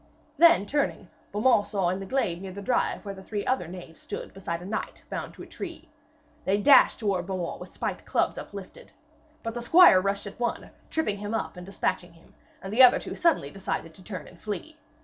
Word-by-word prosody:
Then 340 -11 +7
turning, 285 +6 -1 0.2
Beaumains 210 0 +3
saw 195 -4 0
in 185 +2 -2
a 195 - -7
glade 185 -8 -1
near 190 -1 -6
the 195 - -8
drive 245 -1 0
where 200 - -4
three 205 +1 -4
other 255 -10 0
knaves 175 -2 -10
stood - - -7
beside 170 -3 -4
a 175 - -10
knight 215 +3 -4
bound - - -5
to - - -10
a - - -9
tree. 335 -2 -8 0.5
They 195 +2 +2
dashed 275 +7 +6
towards 195 -5 -1
Beaumains 185 -3 -3
with - - -10
spiked - - -4
clubs - - 0
uplifted. - - -10 0.5
But 230 - -3
the 240 - -4
squire 280 - +7
rushed 200 +1 -1
at 200 - -9
one, 240 -1 -2 0.2
tripped 315 -9 0
him 205 +2 -3
up 160 -7 -3
and 180 0 -9
despatched 195 - -1
him; 165 -1 -20 0.3
and 195 +1 -5
the 245 - +5
others 255 -1 +5
suddenly 320 - +2
decided 165 -3 -4
to 185 - -16
turn 180 -5 -7
and 170 - -16
flee. 215 - -5
200 Hz, 205 wpm, -27 LUFS, 180-240 Hz, 0.5 s, Then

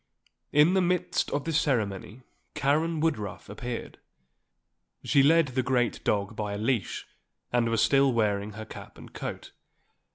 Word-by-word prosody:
In 150 +5 +5
the 190 - +3
midst 180 0 0
of 145 - -2
this 160 -1 +2
ceremony 110 - -2 0.3
Karen 155 +3 +1
Woodruff 110 - -2
appeared. 120 +3 -6 1.0
She 140 - +4
led 160 +1 +4
the 130 +1 0
great 125 -2 0
dog 100 +1 0
by 105 -1 -3
a - - -3
leash 110 0 -1 0.5
and 120 -1 +2
was 115 -1 +2
still 135 -1 +4
wearing 105 -3 0
her 110 +1 -7
cap - - -11
and - - -13
coat. - - -6
125 Hz, 150 wpm, -28 LUFS, 105-150 Hz, 1.0 s, In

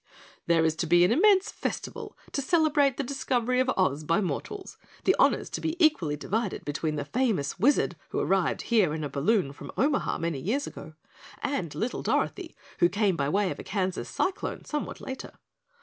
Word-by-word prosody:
"There 165 -1 +4
is 160 -1 +1
to 165 - -1
be 175 +2 +6
an 180 - +2
immense 390 - +4
festival - - -5
to 280 - -1
celebrate 290 -3 +3
the 280 - -1
discovery 250 -2 0
of 255 0 +2
Oz 155 -6 +1
by 165 +5 +2
mortals, 215 - -4 0.2
the - - +4
honors - - +3
to - - -4
be 320 0 -1
equally 300 - +3
divided 205 +7 -2
between 155 +1 -2
the 150 - -3
famous 220 - 0
Wizard 275 +9 +3
who - - -4
arrived - - +1
here 205 -10 +2
in 155 - -4
a 145 - -3
balloon 145 +1 +1
from - - -9
Omaha 285 +1 +1
many 165 -4 -2
years 235 - -1
ago, 155 +1 -10 0.5
and 185 - -2
little 225 +10 -2
Dorothy, - - -1 0.2
who 175 - +5
came 200 -2 +1
by 140 -2 0
way 200 +3 +1
of - - -6
a - - -6
Kansas 190 -3 -2
cyclone 380 - -2
somewhat 300 -2 -4
later. 265 0 -7
205 Hz, 185 wpm, -27 LUFS, -, 0.5 s, be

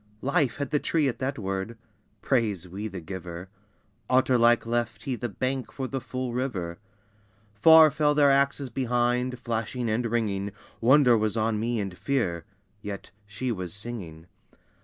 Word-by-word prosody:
Life 140 -1 +1
had 140 -2 -4
the 150 - +2
tree 155 -1 +1
at 125 - -3
that 135 +2 -2
word, 95 +2 -4 0.5
(Praise 105 -9 0
we 100 +5 -5
the 95 -4 -7
Giver!) 90 0 -7 0.6
Otter 130 0 +3
like 120 -1 +4
left 115 -2 -2
he 130 - -2
the 120 0 -4
bank 130 +4 -3
for 135 -1 -4
the 135 0 -4
full 130 0 -4
river. 100 -9 -3 0.7
Far 160 +8 +7
fell 150 0 +2
their 145 -2 +5
axes 140 -1 +1
behind, 125 0 0
flashing 120 0 -3
and 115 +3 0
ringing, 105 -4 -1 0.3
Wonder 125 0 +6
was 110 0 0
on 110 -1 +1
me 115 +1 -1
and 95 -3 -4
fear, 90 -10 -1 0.4
yet 100 -2 -7 0.2
she 120 +5 -3
was 90 -5 -4
singing. 100 -8 -7
120 Hz, 160 wpm, -27 LUFS, 100-130 Hz, 0.7 s, Far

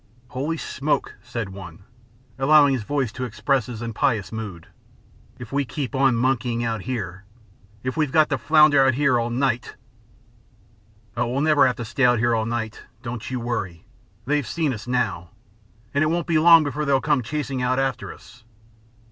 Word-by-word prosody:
"Holy 145 +6 -3
smoke!" 150 -1 -2
said 115 -5 -5
one, 95 -2 -10 0.6
allowing 145 0 +5
his 130 - -1
voice 135 +1 -1
to 130 - -6
express 130 0 0
his 120 -2 -6
impious 115 -4 -1
mood, 105 -7 -6 0.7
"if 120 -2 -10
we 140 +1 +1
keep 135 +1 -5
on 135 -2 +3
monkeying 120 -1 0
out 115 -3 -2
here! 100 -6 -5 0.6
If 130 0 -3
we've 155 -4 0
got 155 0 +4
to 135 - 0
flounder 150 +2 +5
out 130 -2 +3
here 135 -3 +2
all 120 0 -1
night!" 125 0 -1 1.4
"Oh, 120 0 0
we'll 130 +4 -1
never 150 -3 +4
have 125 - 0
to 120 - -6
stay 125 +2 +2
here 120 +1 +2
all 110 0 0
night! 115 -2 -4 0.2
Don't 115 -2 -5
you 130 -1 -3
worry. 110 -8 -4 0.4
They've 145 -2 0
seen 155 -1 -1
us 110 +1 -8
now, 105 -9 -1 0.6
and 140 +2 +2
it - - +2
won't 170 +2 0
be 160 -2 +2
long 165 0 +7
before 150 +1 -3
they'll 140 -2 +2
come 145 -2 +1
chasing 135 +1 -3
out 125 +1 +1
after 135 -3 -2
us." 115 +3 -16
125 Hz, 175 wpm, -23 LUFS, 115-140 Hz, 1.4 s, long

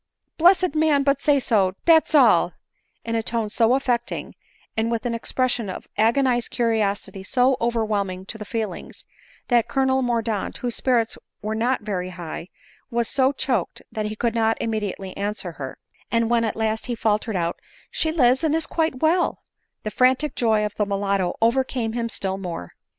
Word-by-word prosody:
Blessed 360 0 +5
man! 305 -3 +3
but 280 0 +2
say 290 -2 +4
so, 200 -7 +2
dat's 320 -2 +5
all," 295 - +5 0.5
in 230 - -2
a 225 - +1
tone 225 -1 -2
so 230 +3 +3
affecting, 245 -2 -2 0.4
and 225 +1 0
with 230 +1 -2
an 240 - 0
expression 235 -1 -1
of 185 - -7
ag 220 +2 +3
onized 255 -4 +1
curiosity 215 -5 -1
so 250 +7 +2
overwhelming 210 -5 -1
to 220 +3 -8
the - - -4
feelings, 215 -4 -5 0.4
that 240 -2 +3
Colonel 265 +1 +2
Mordaunt, 230 -4 -1
whose 245 -1 -3
spirits 235 -3 +1 0.2
were 215 +1 -2
not 235 +4 0
very 185 -4 -3
high, 170 -1 -7 0.4
was 235 -1 0
so 265 0 +2
choked 260 -8 -2
that 215 -2 -2
he 215 - -4
could 230 +1 0
not 225 -1 +2
immediately 205 -4 -3
answer 200 -3 -3
her; 135 -5 -7 0.3
and 230 0 +1
when 230 -1 +3
at 220 - -2
last 220 +1 -1
he 240 - -2
faltered 215 -1 0
out, 170 -1 -1 0.2
" - - -29
She 315 - +1
lives, 260 -2 +3
and 315 -1 +2
is 325 - +1
quite 320 -6 -1
well," 340 +3 +2 0.4
the 215 - -3
frantic 260 +6 +3
joy 220 -3 +2
of 210 - -4
the 210 - +2
mulatto 195 -2 0
overcame 240 -1 +1
him 230 -1 -2
still 190 -3 -3
more. 170 - -6
230 Hz, 180 wpm, -23 LUFS, 210-255 Hz, 0.5 s, Blessed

